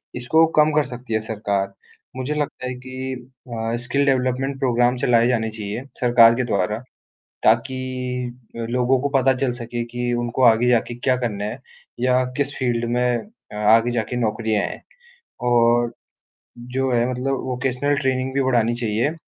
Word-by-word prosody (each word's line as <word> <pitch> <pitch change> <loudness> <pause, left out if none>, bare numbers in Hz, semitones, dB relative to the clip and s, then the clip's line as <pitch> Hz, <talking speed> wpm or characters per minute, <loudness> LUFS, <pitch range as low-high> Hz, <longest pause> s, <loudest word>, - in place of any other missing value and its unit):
इसको 140 +7 +3
कम 150 0 +6
कर 150 -1 +3
सकती 125 -2 -7
है 110 - +2
सरकार। 100 -3 -2 0.4
मुझे 130 +3 -2
लगता 145 -3 -3
है 125 - -3
कि 130 +1 -6 0.3
अ, 115 0 -3
स्किल 140 +2 +1
डेवलपमेंट 135 +1 0
प्रोग्राम 125 -1 +2
चलाए 120 -1 +3
जाने 110 -3 +1
चाहिए 105 +3 -5 0.2
सरकार 120 -2 +6
के 130 - 0
द्वारा। 105 -1 -1 0.6
ताकि 120 +4 +3 0.8
अ, - - -7
लोगों 125 +1 +2
को 145 - 0
पता 135 +1 +3
चल 125 - +1
सके 120 0 -4
कि 120 0 -1
उनको 120 +2 -2
आगे 115 +1 +5
जाके 120 0 +2
क्या 130 +1 +1
करना 105 -5 -3
है 115 +5 -5 0.4
या 125 +1 +3
किस 145 0 -1
फ़ील्ड 120 -2 0
में 125 -1 +2
अ, 210 - -13
आगे 115 +3 +4
जाके 120 +1 -2
नौकरियाँ 110 -2 0
है। - - -7 0.6
और 120 0 +3 0.8
जो 135 0 +1
है 120 +1 +2
मतलब 130 +1 -1
वोकेशनल 130 +2 -1
ट्रेनिंग 130 -1 -1
भी 140 - +2
बढ़ानी 120 -2 +2
चाहिए, 120 +6 -1
120 Hz, 160 wpm, -22 LUFS, 115-130 Hz, 0.8 s, कम